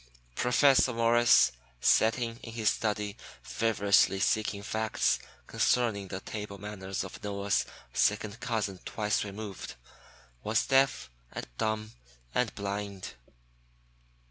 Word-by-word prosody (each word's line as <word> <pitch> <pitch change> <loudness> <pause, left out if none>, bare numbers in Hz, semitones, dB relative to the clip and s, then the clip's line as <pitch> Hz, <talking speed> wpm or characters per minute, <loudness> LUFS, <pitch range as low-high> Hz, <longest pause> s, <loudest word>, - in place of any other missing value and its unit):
Professor 130 - +4
Morris, 115 - +5 0.3
sitting 115 - +2
in 115 - -9
his 110 -2 +2
study 105 -2 -2 0.3
feverishly 100 -3 +2
seeking 105 0 0
facts 110 +1 0 0.3
concerning 110 -6 +1
the 95 +1 -5
table 105 0 -6
manners 95 -2 -5
of 95 - -10
Noah's 100 -1 0 0.3
second 105 +1 +1
cousin 110 -6 -2
twice 105 -2 -1
removed, 100 - -7 0.7
was 110 +1 +1
deaf 135 - +2 0.2
and - - -5
dumb 110 0 -1 0.4
and 125 -3 0
blind. 100 -1 -4
105 Hz, 105 wpm, -30 LUFS, 100-115 Hz, 0.7 s, Morris